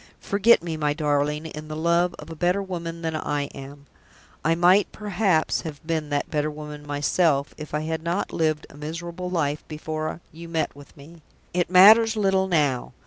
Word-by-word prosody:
Forget 205 -1 +3
me, 165 -2 -4
my 150 -1 0
darling, 150 0 0
in 155 -1 -8
the 155 - -6
love 170 +2 +1
of 150 +2 -10
a - - -7
better 180 +4 +1
woman 170 -3 -6
than 160 -1 -2
I 145 -2 -1
am. 140 +1 -10 0.6
I 165 +3 +2
might, 180 +4 +4
perhaps, 195 -5 0
have 155 -3 -7
been 160 -2 -2
that 145 -1 -2
better 150 0 0
woman 150 -1 -9
myself, 145 0 +1
if 150 -1 -7
I 150 - 0
had 160 +1 -3
not 170 +4 -2
lived 155 -1 0
a 140 - -14
miserable 170 +4 -5
life 150 -4 -1
before 155 +1 -4
you 165 +1 -10
met 160 -3 -1
with 145 0 -15
me. 160 +4 -14 0.3
It 175 -1 0
matters 220 +5 +7
little 195 -2 +2
now. 145 -8 0
160 Hz, 185 wpm, -24 LUFS, 150-175 Hz, 0.6 s, matters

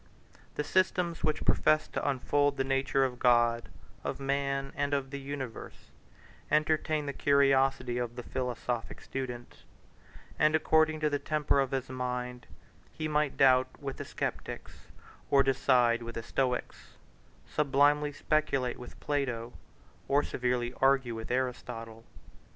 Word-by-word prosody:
The 150 - -1
systems 180 +1 +1
which 155 - 0
professed 155 0 +2
to - - 0
unfold 145 +1 +1
the 135 - +1
nature 135 0 +1
of 125 -2 -4
God, 120 -1 +3 0.3
of - - -3
man, 135 0 -1
and 145 0 0
of 135 -1 -3
the 140 - -4
universe, 135 -4 -7 0.6
entertained 155 0 +1
the 140 - -2
curiosity 135 -3 +2
of 120 -1 -3
the 125 - -6
philosophic 125 -2 -3
student; 125 -3 -6 0.8
and 155 +1 +4
according 155 0 +3
to 155 - +2
the 145 - 0
temper 150 -1 +1
of 135 -1 +1
his 135 -1 -2
mind, 125 -1 -4 0.4
he 155 - -4
might 150 -2 0
doubt 130 -1 +5
with 135 -2 -5
the - - -6
Sceptics, - - -5 0.4
or 140 -1 +5
decide 125 -3 +3
with 115 0 -7
the 115 - -4
Stoics, 125 +1 -3 0.5
sublimely 145 0 +2
speculate 145 -4 0
with 125 - -11
Plato, 125 -5 -2 0.5
or 145 +1 +3
severely 125 -1 -1
argue 135 -3 +3
with 115 0 -7
Aristotle. 120 -3 -3
135 Hz, 135 wpm, -30 LUFS, 125-145 Hz, 0.8 s, doubt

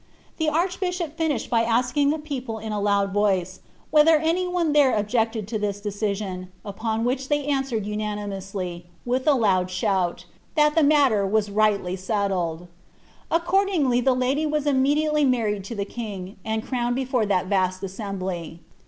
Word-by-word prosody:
The 320 - 0
archbbhop 355 0 -1
tiuished 320 -6 -1
by 230 -1 +4
asking 250 +5 +2
the 305 - +1
people 265 -7 -5
iu 220 +1 -6
a - - -1
land 200 -1 +1
Toice, 190 -3 +1 0.3
whether 310 +1 +6
any 330 +4 0
one 350 -4 0
there 285 -5 +5
objected 220 0 0
to 220 -2 -2
this 205 -1 -2
decision, 200 -3 -3
upon 220 +2 -2
which 260 +2 -1
they 290 -1 +1
answered 270 -7 -1
unanimously, 195 -4 -4 0.2
with 255 +3 -1
a 295 - +6
loud 190 -7 +2
shoui, 185 -2 -1 0.2
' - - -36
that 300 -1 +4
the 325 - +3
matter 285 -8 +4
was 210 0 +1
rightly 200 -3 +1
settled.' 185 -4 -2 0.6
Accordingly 340 -7 +2
the 255 +1 +3
lady 265 +5 +1
was 300 -1 -1
immediately 295 +2 +2
married 225 -7 +1
to 230 - -6
the 200 -1 -2
king, 200 -4 -7
and 220 0 -2
crowned 245 -2 -1
before 255 -4 0
thai 185 -3 +2
vast 185 -1 0
assembly." 185 -4 -5
225 Hz, 160 wpm, -24 LUFS, 200-285 Hz, 0.6 s, whether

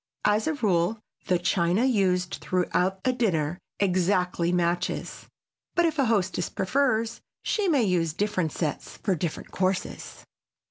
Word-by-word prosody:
As 210 +1 +3
a 315 - +1
rule 205 -3 +1 0.3
the 180 - +3
china 175 +5 +2
used 185 -7 +1
throughout 180 +1 0
a 255 - +3
dinner 175 -8 0 0.2
exactly 180 -2 +1
matches, 175 0 -1 0.5
but 345 -1 +4
if 320 -2 0
a 270 - +4
hostess 190 -5 0
prefers 230 +1 0 0.2
she 420 -3 0
may 290 -8 +3
use 175 -5 +1
different 185 -2 -1
sets 155 -1 -4
for 195 - 0
different 170 -2 -4
courses. 185 0 -2
185 Hz, 135 wpm, -26 LUFS, 175-225 Hz, 0.5 s, but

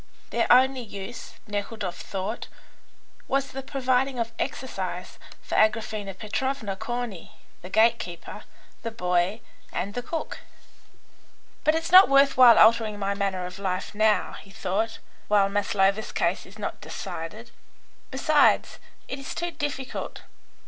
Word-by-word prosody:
Their - - +1
only 260 +1 +5
use, 220 +1 -8
Nekhludoff 205 -2 -4
thought, 195 +4 -4 0.8
was 275 0 0
the 270 - -5
providing 265 -1 0
of 230 -1 -2
exercise 260 0 -4 0.2
for - - -8
Agraphena 215 -2 +1
Petrovna, 220 -1 -2
Corney, 225 -3 -5 0.3
the 180 - -9
gate 225 +3 +4
keeper, 175 -1 -7 0.4
the 230 - -3
boy, 180 0 0 0.3
and 200 +3 -3
the 245 - -3
cook. 320 +6 -5 1.2
"But 310 0 +3
it's 325 +1 -2
not 375 +2 +9
worth 275 0 +5
while 250 -3 +8
altering 220 -1 +5
my 200 0 -1
manner 195 -2 -2
of 180 +2 -8
life 190 0 -3
now," 215 -2 +2
he 195 - -17
thought, 215 +2 -2 0.3
"while 200 -1 +4
Maslova's 200 0 +1
case 170 +2 -1
is 195 +3 -15
not 210 - -5
decided. 215 +9 -7 0.6
Besides, 290 +2 +3 0.3
it 265 - -5
is 275 - -7
too 345 0 -2
difficult. 290 -4 -5
220 Hz, 135 wpm, -26 LUFS, 195-260 Hz, 1.2 s, not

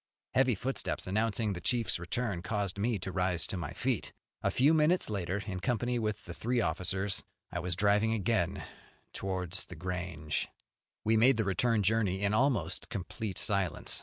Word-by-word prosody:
Heavy 130 -2 +4
footsteps, 130 +7 -2
announcing 110 +1 0
the 90 - -6
chief's 120 -4 +1
return, 100 +1 -2
caused 100 +1 -2
me 110 +2 +1
to 95 0 -5
rise 90 -2 +2
to - - -3
my 85 -5 -4
feet. - - -1 0.3
A - - +2
few 140 +5 +4
minutes 160 -3 +3
later, 95 0 -2
in 95 -3 -4
company 120 +2 0
with 110 -1 -2
the 85 - -6
three 120 +7 0
officers, 95 +2 0 0.3
I 85 - -2
was 90 0 -1
driving 105 +3 +3
again 100 -3 0 0.5
towards 95 -1 -1
The 90 - -9
Grange. 85 -3 -3 0.6
We 110 +1 +3
made 125 +2 +6
the 110 - +2
return 105 +3 +2
journey 100 -2 +1
in 100 +1 +2
almost 130 +3 +1
complete 100 -1 -4
silence. 100 -7 +1
100 Hz, 165 wpm, -31 LUFS, 90-115 Hz, 0.6 s, made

